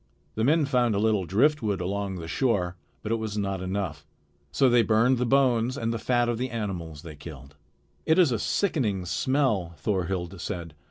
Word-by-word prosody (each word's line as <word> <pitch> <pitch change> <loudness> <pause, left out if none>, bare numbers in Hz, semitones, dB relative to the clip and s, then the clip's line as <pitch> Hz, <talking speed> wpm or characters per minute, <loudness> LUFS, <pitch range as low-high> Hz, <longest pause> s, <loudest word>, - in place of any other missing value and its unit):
The 110 - -1
men 150 +4 +3
found 125 -5 +2
a - - +1
little 105 -3 +2
driftwood 110 - +2
along 100 +1 -2
the 85 -2 -6
shore, 95 -4 0 0.3
but 110 - -3
it 115 - +2
was 110 -1 -4
not 100 -2 -2
enough. 90 -6 -4 0.4
So 135 - +3
they 120 -1 +5
burned 115 +3 +3
the 125 - 0
bones 130 -1 +2
and 115 -2 -1
the 115 - -3
fat 120 +1 +1
of 120 -1 -1
the 130 +1 -2
animals 90 -10 -5
they 80 -2 -9
killed. 75 -1 -11 0.5
"It 160 - +4
is 175 -7 +5
a 115 - 0
sickening 110 - 0
smell," 95 - 0
Thorhild 90 +1 -2
said. 85 -6 -5
105 Hz, 185 wpm, -26 LUFS, 90-125 Hz, 0.5 s, they